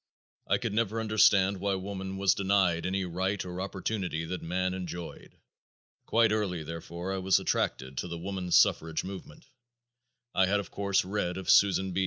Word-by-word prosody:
I -, -, +3 dB
could -, -, -3 dB
never 115 Hz, 0 st, 0 dB
understand 100 Hz, -3 st, +4 dB
why 100 Hz, +1 st, 0 dB
woman 95 Hz, 0 st, -5 dB
was 95 Hz, -1 st, +3 dB
denied 95 Hz, -4 st, +1 dB
any 95 Hz, 0 st, -1 dB
right 95 Hz, +3 st, -2 dB
or 90 Hz, 0 st, -5 dB
opportunity 95 Hz, -4 st, -3 dB
that 90 Hz, +2 st, -5 dB
man 90 Hz, +2 st, -1 dB
enjoyed. 90 Hz, -2 st, -7 dB, 0.7 s
Quite 115 Hz, -1 st, +3 dB
early, 100 Hz, -6 st, -1 dB
therefore, 85 Hz, +3 st, -6 dB
I 95 Hz, -, -2 dB
was 95 Hz, 0 st, +3 dB
attracted 65 Hz, 0 st, -1 dB
to -, -, -3 dB
the 85 Hz, -1 st, -5 dB
woman 95 Hz, +1 st, -5 dB
suffrage 80 Hz, -1 st, +3 dB
movement. 95 Hz, -5 st, -9 dB, 0.9 s
I 95 Hz, 0 st, +3 dB
had 100 Hz, +2 st, +2 dB
of 100 Hz, -, -7 dB
course 100 Hz, -2 st, +1 dB
read 95 Hz, -2 st, -2 dB
of 95 Hz, -, +1 dB
Susan 95 Hz, -1 st, +4 dB
B. 90 Hz, -, -1 dB
95 Hz, 170 wpm, -29 LUFS, 90-100 Hz, 0.9 s, understand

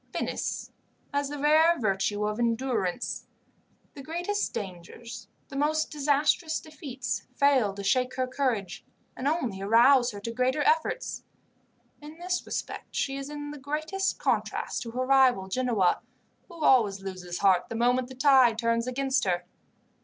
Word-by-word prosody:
"Venice -, -, -3 dB, 0.4 s
has 285 Hz, 0 st, 0 dB
the 290 Hz, -, -5 dB
rare 315 Hz, +4 st, +4 dB
virtue 205 Hz, -1 st, 0 dB
of 210 Hz, +2 st, -3 dB
endurance 235 Hz, -4 st, -1 dB, 0.7 s
the 280 Hz, -, -9 dB
greatest 350 Hz, +8 st, -2 dB
dangers, 195 Hz, +5 st, -8 dB, 0.2 s
the 275 Hz, -, -9 dB
most 310 Hz, +2 st, 0 dB
disastrous 300 Hz, +2 st, +1 dB
defeats, 270 Hz, -6 st, -5 dB
fail 270 Hz, -7 st, +3 dB
to 200 Hz, -, -6 dB
shake 250 Hz, +6 st, +1 dB
her 255 Hz, -, 0 dB
courage, 235 Hz, -7 st, -2 dB, 0.3 s
and 260 Hz, -, -3 dB
only 250 Hz, -, -1 dB
arouse 240 Hz, +5 st, +5 dB
her 205 Hz, -4 st, -7 dB
to 230 Hz, +3 st, -5 dB
greater 255 Hz, +5 st, +1 dB
efforts. 320 Hz, +12 st, 0 dB, 0.8 s
In 300 Hz, +2 st, -11 dB
this 360 Hz, +1 st, -2 dB
respect -, -, -5 dB
she 270 Hz, -, -1 dB
is 275 Hz, +1 st, -5 dB
in 290 Hz, 0 st, -6 dB
the 295 Hz, -, -9 dB
greatest 310 Hz, +8 st, -2 dB
contrast -, -, -1 dB
to 235 Hz, -, -5 dB
her 255 Hz, +2 st, -2 dB
rival, 260 Hz, -7 st, +4 dB
Genoa, 220 Hz, -4 st, +1 dB, 0.5 s
who 335 Hz, -4 st, -8 dB
always 210 Hz, -9 st, +4 dB
loses 180 Hz, -2 st, -6 dB
heart 190 Hz, -3 st, +3 dB
the 230 Hz, -, -5 dB
moment 245 Hz, +2 st, +2 dB
the 260 Hz, -, -11 dB
tide 260 Hz, -4 st, +5 dB
turns 230 Hz, +1 st, 0 dB
against 265 Hz, +1 st, 0 dB
her. 175 Hz, -1 st, 0 dB
255 Hz, 150 wpm, -27 LUFS, 220-290 Hz, 0.8 s, arouse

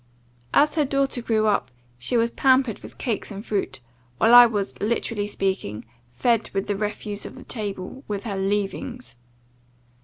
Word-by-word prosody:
"As 300 Hz, +1 st, +4 dB
her 310 Hz, -, +2 dB
daughter 275 Hz, -2 st, 0 dB
grew 220 Hz, -2 st, +1 dB
up, 205 Hz, -11 st, +1 dB, 0.3 s
she 235 Hz, -, 0 dB
was 230 Hz, 0 st, +2 dB
pampered 260 Hz, -4 st, +3 dB
with -, -, -12 dB
cakes 230 Hz, -6 st, -2 dB
and 205 Hz, +1 st, -7 dB
fruit, 200 Hz, -9 st, -2 dB, 0.4 s
while 225 Hz, +2 st, +4 dB
I 245 Hz, 0 st, +11 dB
was, 205 Hz, -3 st, -2 dB
literally 210 Hz, -1 st, -1 dB
speaking, 190 Hz, -, -2 dB, 0.2 s
fed 230 Hz, -, +1 dB
with 195 Hz, -, 0 dB
the 205 Hz, -, -1 dB
refuse 210 Hz, 0 st, -4 dB
of -, -, -8 dB
the -, -, -11 dB
table, 210 Hz, +3 st, -5 dB
with 205 Hz, -2 st, -3 dB
her 210 Hz, -4 st, -3 dB
leavings. 205 Hz, -, -2 dB
215 Hz, 160 wpm, -24 LUFS, 200-240 Hz, 0.4 s, I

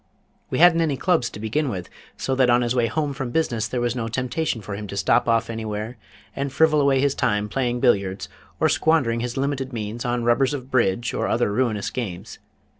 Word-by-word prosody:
We -, -, -2 dB
hadn't 170 Hz, 0 st, +6 dB
any 150 Hz, -4 st, 0 dB
Clubs 170 Hz, -9 st, +1 dB
to -, -, -10 dB
begin 125 Hz, +7 st, -1 dB
with, 90 Hz, -6 st, -5 dB, 0.3 s
so 135 Hz, -, -2 dB
that 130 Hz, -1 st, +3 dB
on 120 Hz, +1 st, +4 dB
his 120 Hz, 0 st, 0 dB
way 120 Hz, -2 st, +2 dB
home 150 Hz, +1 st, -1 dB
from 135 Hz, -3 st, -4 dB
business 120 Hz, -6 st, 0 dB
there 125 Hz, -, -3 dB
was 120 Hz, 0 st, 0 dB
no 115 Hz, -2 st, -2 dB
temptation 125 Hz, +3 st, -2 dB
for 105 Hz, -1 st, -7 dB
him 105 Hz, +1 st, -5 dB
to 100 Hz, -, -6 dB
stop 100 Hz, -, +2 dB
off 115 Hz, 0 st, +2 dB
anywhere 110 Hz, 0 st, -4 dB, 0.4 s
and 140 Hz, 0 st, -2 dB
frivol 155 Hz, +1 st, +3 dB
away 140 Hz, -1 st, +3 dB
his 140 Hz, 0 st, +2 dB
time 105 Hz, -6 st, 0 dB
playing 125 Hz, 0 st, -1 dB
billiards, 100 Hz, -6 st, +1 dB, 0.3 s
or -, -, +4 dB
squandering 140 Hz, -8 st, +2 dB
his 120 Hz, +1 st, -4 dB
limited 135 Hz, -1 st, -2 dB
means 115 Hz, 0 st, -4 dB
on 120 Hz, 0 st, -1 dB
rubbers 130 Hz, +4 st, +2 dB
of 130 Hz, -1 st, -8 dB
bridge 120 Hz, -1 st, +1 dB
or -, -, -1 dB
other 115 Hz, -3 st, +1 dB
ruinous 110 Hz, -4 st, 0 dB
games. 100 Hz, -4 st, -6 dB
120 Hz, 210 wpm, -23 LUFS, 110-135 Hz, 0.4 s, hadn't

